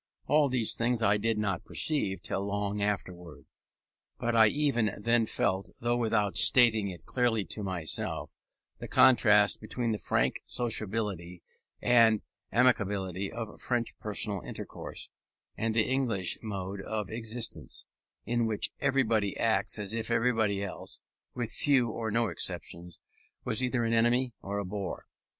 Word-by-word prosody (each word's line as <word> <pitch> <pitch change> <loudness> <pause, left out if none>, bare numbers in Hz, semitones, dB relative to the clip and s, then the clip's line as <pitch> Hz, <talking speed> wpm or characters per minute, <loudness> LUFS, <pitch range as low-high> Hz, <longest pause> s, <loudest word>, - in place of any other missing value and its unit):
All 145 0 +3
these 125 -4 +2
things 115 0 0
I 105 -1 +4
did 110 +1 0
not 100 -4 -1
perceive 95 - -2
till 95 - -2
long 100 0 -2
afterwards; 90 -7 -3 0.7
but 120 -1 -1
I 110 -1 +7
even 130 -3 +1
then 115 +1 +2
felt, 95 -2 -1
though 120 +1 +1
without 110 -4 +1
stating 115 -5 +5
it 90 -4 -8
clearly 120 -5 +1
to 105 - -4
myself, 90 -5 -3 0.5
the - - -6
contrast 105 -5 +5
between 115 +2 -2
the 105 - -2
frank - - 0
sociability 105 -6 -2 0.4
and 115 -3 +5 0.3
amiability 100 -5 +1
of 115 -2 -7
French 120 -2 -1
personal 105 -2 -2
intercourse, - - -7 0.4
and 110 0 -1
the 115 - +3
English 115 -9 0
mode 100 -2 -5
of 105 -1 -4
existence, 115 0 -3 0.4
in 120 -1 +1
which 110 -2 -1
everybody 115 -7 +1
acts 115 0 +1
as 105 0 -1
if 115 0 -3
everybody 115 -4 +1
else 100 - -6 0.4
(with 120 -3 -3
few, 135 -5 +2
or 110 0 -3
no 115 +2 +1
exceptions) 85 -4 -4 0.4
was 110 - +1
either 125 -1 +1
an 115 0 0
enemy 120 +2 +2
or 100 +1 -4
a 100 - -2
bore. 95 0 -5
110 Hz, 140 wpm, -30 LUFS, 100-120 Hz, 0.7 s, I